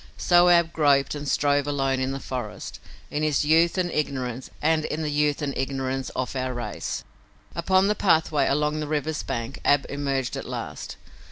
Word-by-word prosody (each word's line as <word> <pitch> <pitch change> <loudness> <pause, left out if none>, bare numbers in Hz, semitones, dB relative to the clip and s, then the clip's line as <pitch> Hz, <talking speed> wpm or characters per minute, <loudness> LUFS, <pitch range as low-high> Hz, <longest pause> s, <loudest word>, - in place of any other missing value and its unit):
So 175 0 +5
Ab 170 -1 +4
groped 140 -3 +3
and 145 -1 -4
strove 145 -1 +2
alone 135 -2 0
in 130 +1 -1
the 135 - -4
forest, 125 -6 -6 0.3
in 150 - -1
his 150 -1 +1
youth 165 +3 +4
and 180 -2 0
ignorance, 130 -4 -2
and 155 0 +2
in 155 +1 -3
the 150 - -1
youth 150 0 +1
and 140 -2 -2
ignorance 135 0 -2
of 130 +1 -3
our 130 -1 -2
race. 120 -4 -4 0.5
Upon 185 +3 +2
the 210 - +3
pathway 160 -8 +2
along 150 +2 +1
the 150 - -3
river's 155 +1 -1
bank 120 -1 -4
Ab 145 -1 +3
emerged 135 -3 -2
at - - -5
last. - - -6
145 Hz, 180 wpm, -25 LUFS, 135-155 Hz, 0.5 s, So